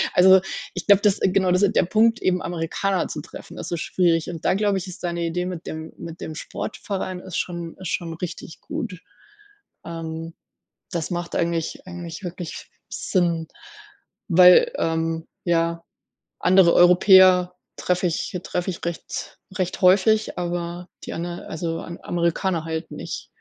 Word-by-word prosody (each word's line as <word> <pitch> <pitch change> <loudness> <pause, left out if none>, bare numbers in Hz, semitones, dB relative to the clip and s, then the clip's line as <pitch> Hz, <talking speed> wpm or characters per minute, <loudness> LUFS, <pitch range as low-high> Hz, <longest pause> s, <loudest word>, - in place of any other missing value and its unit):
Also, 190 +1 +7 0.3
ich 180 - -6
glaube, 200 -1 +6
das 205 -1 +3
genau, 190 -1 +2
das 180 +1 +3
ist 200 - +3
der - - +4
Punkt 225 +5 +3
eben 180 -1 +2
Amerikaner 175 +3 -1
zu 150 - -5
treffen, 155 - -11
das - - -6
ist 170 -2 -3
schwierig. 170 -3 +1
Und 165 -2 -8
da - - +2
glaube 205 -1 +1
ich, 185 - -7
ist 185 - -10
deine 170 -1 -2
Idee 175 +2 -2
mit 180 -2 -6
dem 160 0 -6
mit 165 0 -9
dem 160 - -5
Sportverein 185 +3 -5
ist 185 -1 -6
schon 170 -2 -4
ist 185 -3 -5
schon 165 -1 -2
richtig 165 -1 -7
gut. 235 - -5 0.9
Ähm, 165 0 -6 0.6
das 170 -1 -2
macht 175 -1 -3
eigentlich 170 0 -2
eigentlich 175 +1 -7
wirklich 175 -1 -6 0.3
Sinn, 170 -3 0 0.8
weil, 180 0 +7
ähm, 165 0 -1 0.2
ja, 170 -1 0 0.6
andere 185 -2 +5
Europäer 180 0 +6 0.2
treffe 180 0 0
ich 170 +2 -3
treffe 180 +1 -2
ich 175 - -7
recht 170 -1 -5 0.2
recht 185 +1 -2
häufig, 205 +4 +4
aber 175 0 -4 0.2
die - - -6
aner 175 +1 -5
also, 165 0 -3
Am 170 +1 -8
Amerikaner 170 0 0
halt 160 +1 -4
nicht. - - -6
175 Hz, 155 wpm, -23 LUFS, 165-185 Hz, 0.9 s, Also